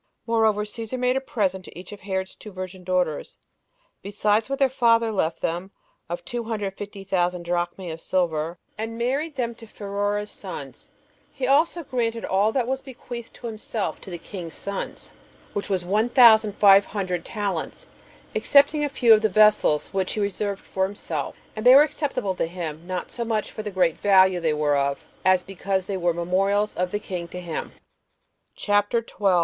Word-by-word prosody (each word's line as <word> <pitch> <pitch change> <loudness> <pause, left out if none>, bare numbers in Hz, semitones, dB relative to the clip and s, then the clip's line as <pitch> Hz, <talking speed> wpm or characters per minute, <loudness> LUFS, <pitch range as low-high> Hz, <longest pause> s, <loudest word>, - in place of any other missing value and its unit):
Moreover, 220 -2 +2
Cæsar 225 +3 -5
made 250 0 +1
a 265 - 0
present 195 -8 -1
to - - -12
each 185 - -11
of 205 - -9
Herod's 190 -1 -3
two 210 - -11
virgin 185 0 -7
daughters, 180 -4 -1 0.6
besides 210 +3 0
what 275 - -1
their 275 - +4
father 230 -3 +3
left 170 -6 -1
them, 175 +3 -2 0.4
of 175 - -5
two 240 -2 -4
hundred 215 -3 -2
and 195 - -18
fifty 200 -1 -7
thousand 180 -2 0
[drachmae] 175 +1 -2
of 160 +1 -8
silver, 170 -2 -1 0.2
and 225 +1 -4
married 275 +6 -1
them 235 -3 -2
to 230 0 -13
Pheroras's 205 0 -3
sons: - - -8 0.4
he 270 - -3
also 315 +6 +3
granted 230 -4 -2
all 200 +3 +2
that 250 0 0
was 265 +2 -2
bequeathed 240 -3 -9
to - - -11
himself 220 -2 -3
to - - -10
the 175 - -5
king's 170 -1 -7
sons, 200 0 -5 0.4
which 205 0 -2
was 185 -3 0
one 210 +6 +1
thousand 220 -4 +7
five 200 -1 +7
hundred 185 -4 -3
talents, 200 -6 -3 0.5
excepting 285 +2 +4
a 290 - 0
few 240 -4 +5
of 215 - +5
the 220 - +2
vessels, 210 -7 +4
which 190 -1 -1
he - - -3
reserved 200 0 -2
for 190 0 0
himself; 200 +2 -4 0.2
and 215 - -5
they 250 +2 +9
were 285 - +9
acceptable 275 -9 -2
to 180 - -1
him, 165 -1 -6
not 185 -1 -4
so 235 - -2
much 220 -2 -1
for - - -6
the 210 - -4
great 180 -4 +1
value 190 -2 +5
they 165 -2 +1
were 150 -1 +1
of, 140 0 -1 0.2
as 185 -1 +4
because 190 0 -2
they 200 - -3
were 175 -2 +1
memorials 195 +5 +1
of 180 0 -1
the 205 - -1
king 180 -4 -5
to 180 - -7
him. 170 -3 -5 0.8
CHAPTER 205 +3 +1
12. 195 -5 +1
200 Hz, 190 wpm, -24 LUFS, 185-230 Hz, 0.8 s, they